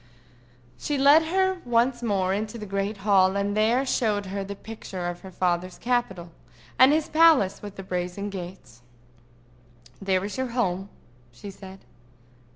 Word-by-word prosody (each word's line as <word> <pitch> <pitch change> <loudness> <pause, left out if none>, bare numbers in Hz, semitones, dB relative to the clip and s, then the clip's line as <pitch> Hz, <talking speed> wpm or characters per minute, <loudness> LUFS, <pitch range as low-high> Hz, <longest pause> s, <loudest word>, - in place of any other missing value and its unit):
She 290 - -2
led 285 +4 +6
her 375 +2 0
once 240 +1 +1
more 195 -5 0
into 215 +3 -3
the 215 - -7
great 200 +1 -3
hall, 190 -2 +4
and 200 +1 -1
there 230 +5 +2
showed 210 -6 0
her 195 +1 -4
the 200 +1 -7
picture 200 -4 -8
of 175 0 -5
her 190 - -10
father's 180 0 -1
capital, 195 -9 -2 0.5
and 260 +2 +8
his 310 0 +1
palace 310 - +4
with 205 -1 -9
the 195 - -8
brazen 180 +2 -4
gates. 175 -10 -9 1.2
"There 190 -1 0
is 205 +5 -6
your 260 - -1
home," 190 -3 -1 0.4
she 120 +12 -10
said. 190 0 -13
200 Hz, 155 wpm, -25 LUFS, 190-240 Hz, 1.2 s, and